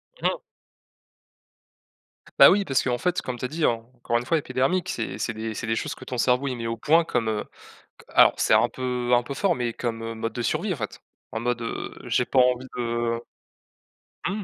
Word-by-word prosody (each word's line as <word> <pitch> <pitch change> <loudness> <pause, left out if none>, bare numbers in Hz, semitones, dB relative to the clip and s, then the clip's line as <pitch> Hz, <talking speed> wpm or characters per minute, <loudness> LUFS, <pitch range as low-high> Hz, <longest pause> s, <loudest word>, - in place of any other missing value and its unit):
Mais - - -21
non! - - -2 2.0
Bah - - +11
oui, 200 +1 +3
parce 135 -5 +2
qu'en 125 -1 0
fait, 180 +6 0
comme 125 -1 -5
tu 125 - -4
as - - 0
dit, 155 +3 -1
encore 120 +1 -1
une 120 - -3
fois, 165 +5 +2
épidermique, 155 +5 0
c'est 115 - -3
c'est 120 - -2
des 110 0 -4
c'est 110 - -5
des 115 - +1
choses - - -3
que - - -12
ton 125 - -4
cerveau, 125 +3 +2
il 130 - -2
met 115 - -5
au 115 0 -3
point 160 +7 +4
comme, 115 -8 -1
heu, 105 -1 -1 0.6
q - - -17
alors - - +6
c'est - - +4
un - - +5
peu 125 -1 -2
un 120 - +4
peu 135 +3 -6
fort, 195 +1 +2
mais 120 -4 -2
comme 115 -1 -4
mode 115 +1 -3
de 120 - -3
survie 175 - 0
en - - -7
fait. 105 -5 -6 0.3
En 110 - -3
mode, 120 0 -1
heu, 115 - -5
j'ai 125 - +1
pas 130 - +2
envie 125 0 +3
de 120 -1 -1 1.1
mmh. 205 +2 -3
125 Hz, 220 wpm, -25 LUFS, 115-140 Hz, 2.0 s, Bah